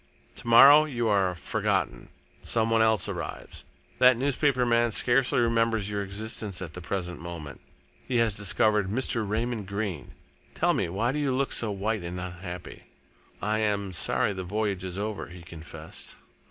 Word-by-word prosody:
To -, -, -9 dB
morrow 140 Hz, +6 st, +8 dB
you 120 Hz, -6 st, -2 dB
are 95 Hz, -3 st, +2 dB
forgotten -, -, -2 dB, 0.3 s
some 115 Hz, -1 st, 0 dB
one 115 Hz, 0 st, +4 dB
else 110 Hz, -1 st, +3 dB
arrives. 85 Hz, -6 st, -6 dB, 0.3 s
That 125 Hz, -1 st, +6 dB
newspaper 135 Hz, -1 st, +1 dB
man 120 Hz, 0 st, +2 dB
scarcely 125 Hz, +4 st, +2 dB
remembers 115 Hz, -3 st, +1 dB
your 100 Hz, -1 st, -2 dB
existence 100 Hz, 0 st, -4 dB
at 85 Hz, -4 st, -7 dB
the 90 Hz, -, -8 dB
present 90 Hz, -1 st, -4 dB
moment. 85 Hz, -5 st, -8 dB, 0.5 s
He 130 Hz, -, -2 dB
has 115 Hz, -2 st, +2 dB
discovered 105 Hz, 0 st, +2 dB
Mr. 115 Hz, -2 st, -1 dB
Raymond 110 Hz, -1 st, -2 dB
Greene.... 100 Hz, -2 st, -4 dB, 0.4 s
Tell -, -, +2 dB
me, -, -, -1 dB
why 110 Hz, +8 st, 0 dB
do 150 Hz, -, -2 dB
you 145 Hz, -2 st, 0 dB
look 135 Hz, +1 st, 0 dB
so 115 Hz, -, 0 dB
white 105 Hz, +2 st, -2 dB
and 85 Hz, +1 st, -5 dB
unhappy?" 90 Hz, 0 st, -8 dB, 0.6 s
"I 110 Hz, +1 st, 0 dB
am 100 Hz, -2 st, -1 dB
sorry 90 Hz, -, +1 dB
the 95 Hz, -1 st, -5 dB
voyage 100 Hz, 0 st, -2 dB
is 90 Hz, 0 st, -5 dB
over," 105 Hz, 0 st, -4 dB
he 85 Hz, 0 st, -12 dB
confessed. 80 Hz, -1 st, -9 dB
105 Hz, 165 wpm, -27 LUFS, 90-115 Hz, 0.6 s, morrow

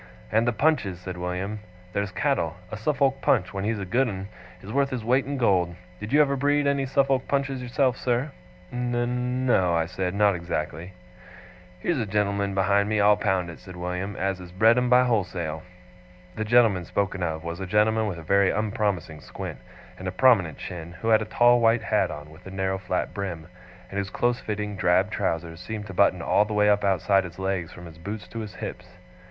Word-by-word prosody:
'And 110 Hz, +2 st, +2 dB
the -, -, +4 dB
Punches,' 110 Hz, -, +1 dB
said 90 Hz, 0 st, -6 dB
William. 90 Hz, +4 st, -3 dB, 0.3 s
'There's 100 Hz, 0 st, -1 dB
cattle! 95 Hz, -, 0 dB, 0.2 s
A -, -, -3 dB
Suffolk 135 Hz, +3 st, +1 dB
Punch, 90 Hz, -4 st, +2 dB
when 95 Hz, 0 st, -3 dB
he's 110 Hz, +1 st, 0 dB
a 100 Hz, -, -4 dB
good 125 Hz, +8 st, +2 dB
un, 95 Hz, -1 st, -6 dB, 0.3 s
is 100 Hz, -, -7 dB
worth 140 Hz, 0 st, +2 dB
his 125 Hz, -4 st, -4 dB
weight 130 Hz, +3 st, +2 dB
in 140 Hz, 0 st, -2 dB
gold. 90 Hz, -8 st, +2 dB, 0.2 s
Did 105 Hz, +2 st, -6 dB
you 145 Hz, -, +5 dB
ever 140 Hz, -1 st, 0 dB
breed 145 Hz, +2 st, +2 dB
any 140 Hz, -1 st, +1 dB
Suffolk 135 Hz, -1 st, +1 dB
Punches 140 Hz, -2 st, -1 dB
yourself, 125 Hz, 0 st, +1 dB
sir?' 125 Hz, +4 st, -1 dB, 0.4 s
'N 125 Hz, +1 st, -1 dB
no,' 90 Hz, -8 st, +3 dB
I 80 Hz, -1 st, +1 dB
said, 90 Hz, +1 st, -3 dB
'not 100 Hz, -1 st, +4 dB
exactly.' 85 Hz, 0 st, -4 dB, 0.9 s
'Here's 170 Hz, -6 st, 0 dB
a 110 Hz, -, -2 dB
gen'lm'n 100 Hz, -1 st, 0 dB
behind 100 Hz, +1 st, +2 dB
me, 110 Hz, -1 st, +1 dB
I'll 105 Hz, +1 st, +6 dB
pound 95 Hz, -4 st, 0 dB
it,' -, -, -12 dB
said 95 Hz, -1 st, -11 dB
William, 90 Hz, +3 st, -4 dB
'as 95 Hz, -1 st, -1 dB
has 90 Hz, -1 st, -10 dB
bred 110 Hz, +5 st, +5 dB
'em 125 Hz, 0 st, +1 dB
by 125 Hz, +1 st, +6 dB
wholesale.' 90 Hz, -9 st, -1 dB, 0.7 s
The 110 Hz, -, -2 dB
gentleman 110 Hz, -6 st, +4 dB
spoken 95 Hz, +2 st, -1 dB
of 80 Hz, -2 st, -2 dB
was 85 Hz, +1 st, -5 dB
a 95 Hz, -, -4 dB
gentleman 110 Hz, +2 st, +2 dB
with 95 Hz, -4 st, -4 dB
a 80 Hz, -, -9 dB
very 100 Hz, +4 st, +3 dB
unpromising 100 Hz, -7 st, -1 dB
squint, -, -, -7 dB, 0.4 s
and 95 Hz, -, -5 dB
a -, -, -1 dB
prominent 95 Hz, -, +4 dB
chin, 85 Hz, -1 st, -7 dB
who 115 Hz, -, +1 dB
had 110 Hz, -1 st, +5 dB
a -, -, -2 dB
tall 120 Hz, +2 st, +4 dB
white 115 Hz, 0 st, +3 dB
hat -, -, +1 dB
on 75 Hz, +1 st, -8 dB
with 85 Hz, +4 st, -14 dB
a -, -, -6 dB
narrow 95 Hz, 0 st, -2 dB
flat 90 Hz, -1 st, -2 dB
brim, 90 Hz, -5 st, -4 dB, 0.5 s
and 100 Hz, -, -2 dB
whose 100 Hz, -1 st, -3 dB
close 120 Hz, +5 st, 0 dB
fitting 105 Hz, -1 st, -4 dB
drab 95 Hz, +2 st, +2 dB
trousers 85 Hz, -5 st, -2 dB
seemed 105 Hz, +2 st, -6 dB
to 95 Hz, -, -8 dB
button 90 Hz, -2 st, +3 dB
all -, -, +4 dB
the 105 Hz, 0 st, -4 dB
way 105 Hz, 0 st, +4 dB
up 105 Hz, 0 st, +2 dB
outside 95 Hz, 0 st, +3 dB
his 85 Hz, -2 st, -9 dB
legs 95 Hz, -3 st, -2 dB
from 90 Hz, -, -11 dB
his 80 Hz, -1 st, -12 dB
boots 100 Hz, +2 st, -6 dB
to 115 Hz, -, -6 dB
his 105 Hz, -3 st, -7 dB
hips. -, -, -8 dB
100 Hz, 210 wpm, -25 LUFS, 90-120 Hz, 0.9 s, I'll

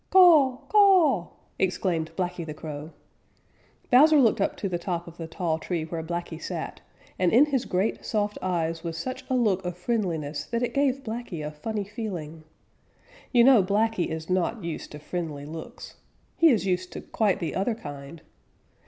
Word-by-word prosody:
_ -, -, -45 dB
"Caw, 320 Hz, -9 st, +6 dB
ca 425 Hz, -, +3 dB
a 370 Hz, -, +6 dB
w!" 175 Hz, -, -12 dB, 0.3 s
exclaimed 180 Hz, -3 st, 0 dB
Blacky 180 Hz, -1 st, -2 dB
the 155 Hz, -2 st, -7 dB
Crow. 150 Hz, -1 st, -7 dB, 1.0 s
Bowser 300 Hz, +5 st, +7 dB
looked 230 Hz, -6 st, +3 dB
up -, -, 0 dB
to 200 Hz, -, -2 dB
the 175 Hz, -2 st, -2 dB
top 175 Hz, -1 st, -3 dB
of 170 Hz, 0 st, -12 dB
the 165 Hz, -, -6 dB
tall 165 Hz, -2 st, -2 dB
tree 170 Hz, -1 st, -3 dB
where 165 Hz, 0 st, -4 dB
Blacky 170 Hz, 0 st, -5 dB
sat, 170 Hz, -3 st, -5 dB, 0.4 s
and 180 Hz, -2 st, +3 dB
in 255 Hz, +6 st, +6 dB
his 275 Hz, -5 st, -1 dB
great, 190 Hz, +4 st, -1 dB
soft 210 Hz, -2 st, -1 dB
eyes 165 Hz, -2 st, -1 dB
was 165 Hz, -1 st, -4 dB
such 255 Hz, +9 st, -5 dB
a 260 Hz, -, +1 dB
look 205 Hz, -6 st, +2 dB
of 180 Hz, -1 st, -4 dB
friendliness 170 Hz, -9 st, -2 dB
that 235 Hz, +1 st, -2 dB
it 245 Hz, -, -2 dB
gave 275 Hz, -1 st, +1 dB
Blacky 220 Hz, -9 st, -5 dB
a 150 Hz, -, -4 dB
funny 205 Hz, +8 st, -4 dB
feeling. 185 Hz, -7 st, -6 dB, 0.9 s
You 240 Hz, -2 st, +6 dB
know 255 Hz, -4 st, +7 dB
Blacky 205 Hz, 0 st, +1 dB
is 160 Hz, 0 st, -5 dB
not 185 Hz, +4 st, 0 dB
used 165 Hz, -2 st, -5 dB
to -, -, -6 dB
friendly 150 Hz, -2 st, -5 dB
looks. 160 Hz, +2 st, -9 dB, 0.4 s
He 330 Hz, -, +6 dB
is 220 Hz, -8 st, +2 dB
used 185 Hz, -1 st, -1 dB
to -, -, -6 dB
quite 210 Hz, -4 st, 0 dB
the 170 Hz, -, -3 dB
other 210 Hz, +4 st, 0 dB
kind. 145 Hz, -5 st, -9 dB
185 Hz, 185 wpm, -26 LUFS, 165-230 Hz, 1.0 s, Bowser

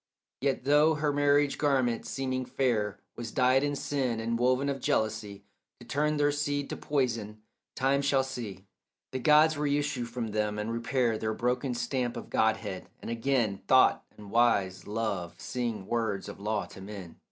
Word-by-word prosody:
Yet 135 Hz, -2 st, 0 dB
though 150 Hz, +3 st, +4 dB
her 150 Hz, -1 st, 0 dB
marriage 145 Hz, 0 st, +3 dB
garment, 130 Hz, -5 st, +1 dB
seeming 130 Hz, -1 st, -2 dB
fair, 115 Hz, -7 st, 0 dB, 0.2 s
Was 115 Hz, -2 st, -6 dB
dyed 130 Hz, +1 st, +4 dB
in 145 Hz, 0 st, 0 dB
sin 130 Hz, -5 st, -1 dB
and 115 Hz, +1 st, -1 dB
woven 130 Hz, +3 st, +2 dB
of 140 Hz, -1 st, -1 dB
jealousy 110 Hz, -4 st, -1 dB, 0.4 s
To 120 Hz, -, -13 dB
turn 150 Hz, +4 st, 0 dB
their 145 Hz, 0 st, +3 dB
seed 145 Hz, -1 st, -2 dB
to -, -, -2 dB
poison, 115 Hz, -7 st, -2 dB, 0.3 s
time 135 Hz, +1 st, +2 dB
shall 140 Hz, -1 st, +2 dB
see 110 Hz, -8 st, -6 dB, 0.5 s
The 130 Hz, -, -3 dB
gods 150 Hz, +3 st, +5 dB
reissue 145 Hz, -3 st, 0 dB
from 120 Hz, -1 st, -4 dB
them, 105 Hz, 0 st, -1 dB
and 105 Hz, +2 st, -2 dB
repair 115 Hz, -1 st, 0 dB
Their 110 Hz, 0 st, -2 dB
broken 125 Hz, +1 st, -1 dB
stamp 120 Hz, 0 st, -2 dB
of -, -, -8 dB
godhead, -, -, 0 dB
and -, -, -6 dB
again 115 Hz, -4 st, 0 dB
Thought -, -, +5 dB
and 105 Hz, -1 st, -11 dB
wise 100 Hz, -6 st, +2 dB
love 105 Hz, -5 st, -3 dB
sing 115 Hz, -6 st, -3 dB
words 110 Hz, -3 st, -1 dB
of -, -, -8 dB
law 105 Hz, 0 st, -1 dB
to 95 Hz, -, -12 dB
men. 95 Hz, -4 st, -9 dB
125 Hz, 165 wpm, -29 LUFS, 110-140 Hz, 0.5 s, gods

